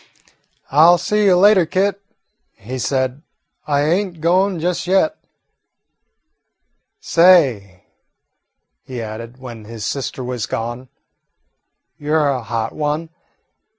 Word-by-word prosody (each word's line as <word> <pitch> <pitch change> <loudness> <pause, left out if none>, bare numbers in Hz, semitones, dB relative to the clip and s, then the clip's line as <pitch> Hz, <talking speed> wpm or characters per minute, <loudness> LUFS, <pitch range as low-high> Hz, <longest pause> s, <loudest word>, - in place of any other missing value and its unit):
"I 150 +3 +5
'll 175 0 +6
see 210 +4 0
you 185 -2 +5
later, 190 -2 +5
Kit," 195 +3 0 0.5
he 125 +6 -8
said; 130 +1 -1 0.5
"I 145 -1 +1
ain't 175 +2 -1
goin' 180 +3 +1
just 175 +1 -2
yet. 195 +12 +2 1.8
Say," 135 - +3 1.0
he 125 -2 -7
added, 115 +2 -8
when 120 -4 -10
his 110 -1 -7
sister 135 -1 -4
was 125 -3 -4
gone, 120 +3 -5 1.1
"you 150 +1 -1
're 150 -2 +2
a 130 -2 -1
hot 115 0 -4
one. 155 +2 -3
145 Hz, 115 wpm, -18 LUFS, 120-180 Hz, 1.8 s, ll